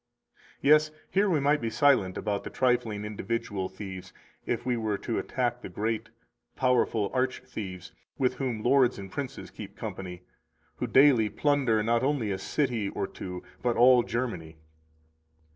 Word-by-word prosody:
230 - - 0
Yes, 155 +1 +4
here 200 +1 +3
we 160 -5 +2
might 145 +2 +2
be 115 - -1
silent 110 -6 +3
about 105 -2 -2
the - - -6
trifling 120 -5 0
individual 105 -2 -3
thieves 95 -1 -8 0.4
if 120 - -1
we 125 -1 +1
were 110 -3 -1
to 115 +3 -2
attack 120 -1 -2
the - - -7
great, 110 +4 -2 0.5
powerful 120 -5 +1
arch 130 -1 0
thieves 95 -8 -7 0.3
with 130 -1 +2
whom 125 -5 -3
lords 130 -1 +4
and 95 -1 -8
princes 135 +1 -6
keep 100 -1 -10
company, 90 -4 -6 0.5
who - - -2
daily 130 -6 +5
plunder 130 -7 +2
not 115 +1 +2
only 130 -6 0
a 95 - -2
city 120 -3 -1
or - - -2
two, 90 -1 -7 0.2
but 120 -1 0
all 125 +1 +7
Germany. 90 -11 -4
115 Hz, 160 wpm, -28 LUFS, 100-130 Hz, 0.5 s, all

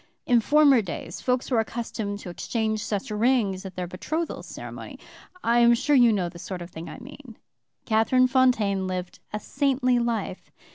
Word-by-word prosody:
In 240 -2 +4
former 285 -1 +5
days 175 -3 -6
folks 250 +1 -1
were 240 - +3
accustomed 225 -2 -3
to 180 - -7
exchange 220 +3 -2
such 210 +3 -3
rings 210 -4 +1
at 185 - -11
their 180 - -3
betrothal 310 - -4
ceremony. - - -9 0.5
I 235 +1 +3
am 235 0 +6
sure 290 +5 +1
you 240 -3 +6
know 190 -5 0
the 170 0 -10
sort 180 0 -6
of 170 - -12
thing 165 +1 -8
I - - -8
mean. 265 -2 -12 0.5
"Catherine 225 +3 +3
Fontaine 235 -7 +2
lived 180 -1 -5
a 210 - -3
saintly 255 0 +1
life. 230 -5 -3
225 Hz, 175 wpm, -25 LUFS, 195-255 Hz, 0.5 s, am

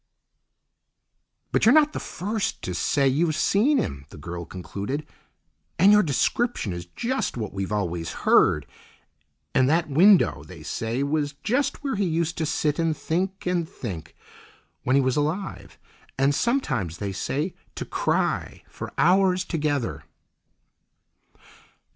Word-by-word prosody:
"But - - +1
you're 230 +6 +7
not 305 -1 +5
the - - -3
first 210 +3 -3
to 90 - -3
say 140 +9 +2
you've 155 +4 +2
seen 215 - +3
him," 70 - -3
the - - -12
girl 85 0 -6
concluded; 100 - -5 0.7
"and 190 +4 +6
your 210 0 +7
description 170 - 0
is 85 0 -7
just 255 - -1
what 110 -4 -4
we've 95 +1 -3
always 90 -5 -2
heard, 75 -2 +4 0.9
and 130 0 +4
that 160 +1 +2
window, 185 +6 +5
they - - -12
say, 115 +4 -2
was 145 0 -1
just 270 +6 0
where 275 -4 -1
he 200 - +1
used 170 +1 0
to 160 - 0
sit 150 -1 0
and 165 -2 +1
think, 190 +4 -2
and 175 -2 0
think, 85 -9 -7 0.7
when 130 - +1
he 140 - +5
was 130 +1 +1
alive, 145 - -3 0.4
and 135 +2 +3
sometimes, 135 - 0
they 100 0 -3
say, 145 - -2 0.2
to - - -4
cry - - -1
for - - -8
hours 185 +1 +3
together." 145 -7 -2
150 Hz, 140 wpm, -25 LUFS, -, 0.9 s, you're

